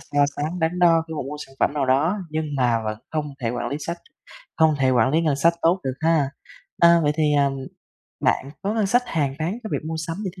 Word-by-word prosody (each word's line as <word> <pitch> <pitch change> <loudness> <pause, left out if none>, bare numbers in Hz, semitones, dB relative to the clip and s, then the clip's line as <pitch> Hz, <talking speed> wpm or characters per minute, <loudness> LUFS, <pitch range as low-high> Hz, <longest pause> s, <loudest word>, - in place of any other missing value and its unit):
so 145 0 +1
sánh, 155 +5 -3
đắn 165 +2 0
đo 165 -2 +5
khi 160 - -5
mà - - -3
mua 140 +3 -6
sản 135 - -19
phẩm - - +3
nào 140 -3 0
đó, 155 +10 +2
nhưng 155 0 -2
mà 120 -3 +2
vẫn 110 0 -3
không 150 -2 -3
thể 115 - -1
quản 120 - -3
lý 145 - -3
sách 170 +3 -4 0.6
không 160 -1 +4
thể 130 -1 +3
quản 125 +1 +3
lý 160 +2 +2
ngân 150 -4 +1
sách 170 +4 +3
tốt 175 +3 +3
được 130 - -1
ha. 155 -4 +2 0.5
A, 170 0 +7
vậy 145 0 +2
thì, 150 -2 +2
ờm, 140 -1 +2 0.7
bạn 135 - +1
có 205 +3 -1
ngân 215 -3 +1
sách 245 +5 +3
hàng 145 - -1
tháng 175 +9 -2
cho 220 - -5
việc - - -2
mua 160 0 -3
sắm 165 - -4
như 190 - -2
thế - - -12
155 Hz, 255 wpm, -23 LUFS, 135-170 Hz, 0.7 s, A